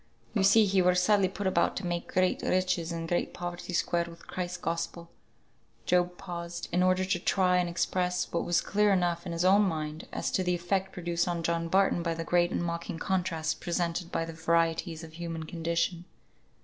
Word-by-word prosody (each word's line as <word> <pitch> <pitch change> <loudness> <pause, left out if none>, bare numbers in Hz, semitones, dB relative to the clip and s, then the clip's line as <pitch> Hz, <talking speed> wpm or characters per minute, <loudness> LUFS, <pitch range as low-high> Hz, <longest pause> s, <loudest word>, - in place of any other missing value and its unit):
You - - +1
see 205 +3 +6
he 195 -1 +3
were 180 0 +4
sadly 190 +2 +4
put 200 +2 -5
about 185 -2 +2
to 195 - -4
make 175 -1 -3
great 185 0 +2
riches 185 -2 0
and 165 -1 -4
great 175 +1 -1
poverty 175 +1 -5
square 170 0 0
with 170 0 -13
Christ's 180 0 -4
Gospel" 170 0 -4 0.7
Job 180 0 +2
paused, 170 0 -6
in 175 +1 +2
order 185 0 +3
to 185 -1 0
try 180 0 +2
and 180 -1 +1
express 180 +1 0
what 170 - 0
was 175 - +2
clear 210 0 +2
enough 175 -2 +1
in - - -4
his 170 +1 -1
own 195 +3 +6
mind, 155 -5 -2
as - - -2
to 185 - +1
the 180 0 +1
effect 190 +2 -1
produced 175 -1 -1
on 170 -1 -2
John 165 0 0
Barton 190 0 +3
by 170 -1 -1
the 165 - -3
great 175 +1 +2
and - - -2
mocking 170 -1 -3
contrasts 170 -3 -1
presented 170 0 -2
by 165 - -1
the 165 - -7
varieties 165 0 0
of 160 -1 -10
human 165 -1 -5
condition. 170 +1 -1
175 Hz, 200 wpm, -29 LUFS, 170-185 Hz, 0.7 s, see